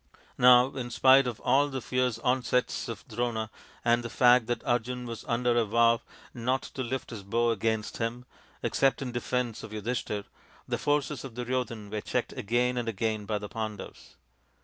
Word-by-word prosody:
Now 125 +1 +7
in 125 -2 -4
spite 130 +2 +5
of 120 -3 -4
all 145 +2 +3
the 135 -2 -4
fierce 125 -2 0
onsets 125 0 +1
of 115 -3 -7
Drona, 110 -1 -2 0.3
and 120 0 +4
the 115 - -5
fact 125 -1 +5
that 120 - -2
Arjun 125 +1 -1
was 115 -2 -6
under 120 0 +1
a 120 - +4
vow 115 +2 +3 0.3
not 125 +2 -1
to 135 - -4
lift 130 +1 -4
his 110 -3 -6
bow 115 +4 +1
against 110 0 -1
him, 120 +2 -3 0.4
except 135 +1 +2
in 125 - -4
defence 120 -1 -2
of - - -8
Yudhishthir, 105 -1 -3 0.4
the - - -2
forces 145 -2 0
of 130 -4 -8
Duryodhan 120 -4 -3
were 105 -1 -2
checked - - -2
again 125 +3 0
and 120 -1 -1
again 110 -1 -2
by 105 -1 0
the 105 0 -6
Pandavs. 110 -2 -7
120 Hz, 175 wpm, -29 LUFS, 115-125 Hz, 0.4 s, Now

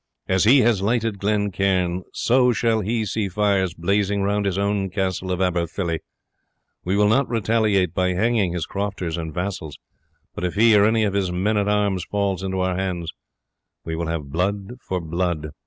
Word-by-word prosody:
As 95 0 +2
he 130 +4 +6
has 115 -5 +2
lighted 110 0 0
Glen 105 0 0
Cairn, 90 -2 0
so 125 +1 +3
shall 115 -1 +1
he 110 +2 -1
see 105 -1 -2
fires 95 -2 +1
blazing 100 +3 0
round 100 0 0
his 95 -1 -1
own 100 -1 0
castle 95 -1 -2
of 90 0 -1
Aberfilly. 85 -1 -1 0.8
We 95 +3 0
will 105 0 +4
not 125 +6 +2
retaliate 110 -5 +1
by 90 +1 +1
hanging 105 -1 +1
his 85 -3 -2
crofters 100 -4 -3
and 80 -2 -5
vassals; 90 -3 -4 0.6
but - - -6
if 90 +1 -2
he 110 +1 +5
or 100 0 +6
any 110 0 +3
of 100 -2 0
his 95 -3 0
men 95 +5 0
at 100 0 +1
arms 100 -3 +1
falls 100 -2 -1
into 95 -1 -2
our 95 -1 0
hands, 90 -3 -3 0.7
we 80 - -3
will 85 0 -3
have 80 -4 -4
blood 100 - -2
for 95 - -3
blood." 85 -2 -2
95 Hz, 185 wpm, -22 LUFS, 90-105 Hz, 0.8 s, he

